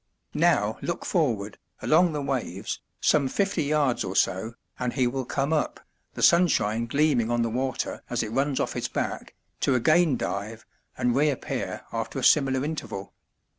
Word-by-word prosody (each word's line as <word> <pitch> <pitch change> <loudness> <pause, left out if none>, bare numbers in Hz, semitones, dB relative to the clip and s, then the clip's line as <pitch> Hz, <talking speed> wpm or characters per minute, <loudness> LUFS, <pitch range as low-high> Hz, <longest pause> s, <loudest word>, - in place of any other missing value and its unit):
Now - - +2
look - - -3
forward, 115 - 0 0.2
along 170 +2 +4
the 145 -1 -2
waves, 115 -8 -3 0.2
some 140 -3 +3
fifty 195 +3 0
yards 145 -4 +1
or 95 0 -4
so, 100 +4 0 0.2
and 125 -1 -1
he 130 -2 +2
will 130 +1 -2
come 140 +5 -1
up, 155 - -1 0.4
the - - -3
sunshine 115 -10 +3
gleaming 140 -3 +2
on 120 0 +1
the 115 - -1
water 130 +2 -2
as 120 -1 0
it 110 - -5
runs 135 +2 0
off - - -1
his - - -2
back, - - -4 0.2
to 135 - +2
again 155 +2 +3
dive, 110 +3 -4 0.3
and 125 -1 +1
reappear 145 -1 -1
after - - -3
a - - -3
similar 135 -2 +4
interval. 115 -11 -5
130 Hz, 165 wpm, -26 LUFS, 115-150 Hz, 0.4 s, along